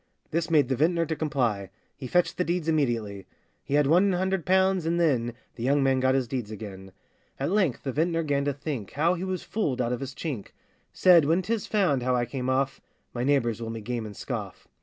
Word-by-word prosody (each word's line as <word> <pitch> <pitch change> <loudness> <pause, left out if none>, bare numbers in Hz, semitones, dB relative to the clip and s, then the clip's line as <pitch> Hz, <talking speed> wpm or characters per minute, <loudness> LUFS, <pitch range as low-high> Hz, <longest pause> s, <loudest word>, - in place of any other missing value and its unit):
This 165 +1 -1
made 150 -5 +4
the 130 - 0
vintner 165 +5 +2
to 160 - -2
comply,— 125 -11 -1 0.3
He 130 - -7
fetched 175 +6 +1
the 180 - +2
deeds 175 -1 -2
immediately; 115 - -1 0.4
He 140 - -1
had 150 0 +4
one 180 +7 +4
hundred 190 -1 -1
pounds, 190 -2 +3
and 170 +1 +1
then 125 -8 +1 0.2
The - - -7
young 140 +2 +3
man 135 -1 +3
got 130 0 +2
his 130 -2 0
deeds 120 -3 -3
again. 100 -3 -8 0.5
At 140 +5 -1
length 190 - +1
the 135 - -2
vintner 165 +4 0
'gan 140 -2 0
to 145 - 0
think 140 -7 -5
How 165 +5 +2
he 180 0 -4
was 185 -1 -3
fooled 150 - -2
out 125 -1 0
of 125 - -3
his 135 -1 -6
chink; 135 - -5 0.4
Said, 175 -5 +6
'When 165 +5 +2
'tis 220 +2 -2
found 185 - +2
how 125 +1 +1
I 120 -1 +1
came 125 +1 -4
off, 135 +1 0 0.3
My 120 - -2
neighbours 125 -4 +1
will 115 - -4
me 115 0 -5
game 115 0 -3
and 105 - -10
scoff. - - -6
140 Hz, 225 wpm, -27 LUFS, 125-170 Hz, 0.5 s, Said